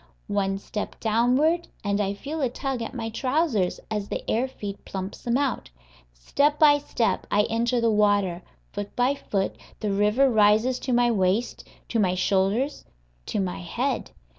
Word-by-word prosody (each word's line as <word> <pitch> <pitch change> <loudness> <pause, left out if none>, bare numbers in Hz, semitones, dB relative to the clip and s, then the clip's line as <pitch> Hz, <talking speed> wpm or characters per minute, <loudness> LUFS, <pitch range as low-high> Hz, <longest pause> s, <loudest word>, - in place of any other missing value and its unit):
One 195 -1 +1
step 210 +1 -6
downward, 255 +10 +2 0.2
and 200 0 0
I 200 0 -1
feel 295 +9 -5
a 260 - +2
tug 260 0 -3
at 230 - -5
my 225 -2 -3
trousers 255 - 0
as 210 -2 -2
the - - -4
air 240 +4 +1
feed 205 -6 -7
plumps 190 0 -6
them 240 +1 +1
out. 275 - -1 0.4
Step 280 - +1
by 295 -2 +6
step 230 -7 -1
I 205 +1 +3
enter 235 +2 +1
the 230 -1 +2
water; 205 -4 +2 0.3
foot 205 0 -6
by 250 +3 +2
foot 200 -8 -2 0.2
the 210 - -1
river 210 +7 +3
rises 220 +2 +3
to 260 - -3
my 240 0 +3
waist, 200 +3 0 0.2
to 230 - 0
my 185 -3 +2
shoulders 200 +9 +1 0.4
to - - -1
my 185 -2 -2
head. 245 +9 -2
225 Hz, 165 wpm, -25 LUFS, 200-255 Hz, 0.4 s, by